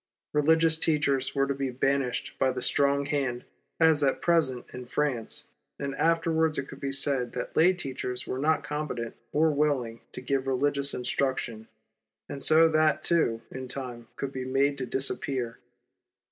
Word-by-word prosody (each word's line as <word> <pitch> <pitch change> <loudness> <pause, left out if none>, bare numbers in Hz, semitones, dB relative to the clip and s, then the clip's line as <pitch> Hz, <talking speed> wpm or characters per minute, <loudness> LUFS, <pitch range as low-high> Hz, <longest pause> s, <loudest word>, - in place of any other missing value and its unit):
Eeligious 160 +2 +4
teachers 140 -4 +1
were 135 0 +3
to 140 - -1
be 135 -1 -2
banished 130 -1 -1
by 130 - +3
the 130 0 -3
strong 140 +2 +2
hand, 135 -4 -2 0.3
as 160 -3 +4
at 135 - +2
present 155 -8 +1
in 125 - -6
France, 125 -2 -2 0.3
and 140 -1 -4
afterwards 160 +1 +1
it 140 - -3
could - - -10
be 140 -1 -3
said 135 -2 0
that - - -5
lay 170 +4 +6
teachers 130 -7 -4
were 130 - -4
not 155 +3 +2
competent 145 -6 -4 0.2
or 155 +1 +3
willing 140 -6 0
to - - -7
give 135 +1 -1
religious 140 +1 0
instruction, 125 -3 -2 0.6
and 140 - -7
so 160 +3 +6
that, 155 -1 +2
too, 135 -10 +1
in 130 0 -6
time, 125 -3 -6
could 140 - -4
be 130 -1 -5
made 135 +2 +1
to 130 -2 -4
disappear. 130 -2 +1
140 Hz, 160 wpm, -28 LUFS, 130-150 Hz, 0.6 s, lay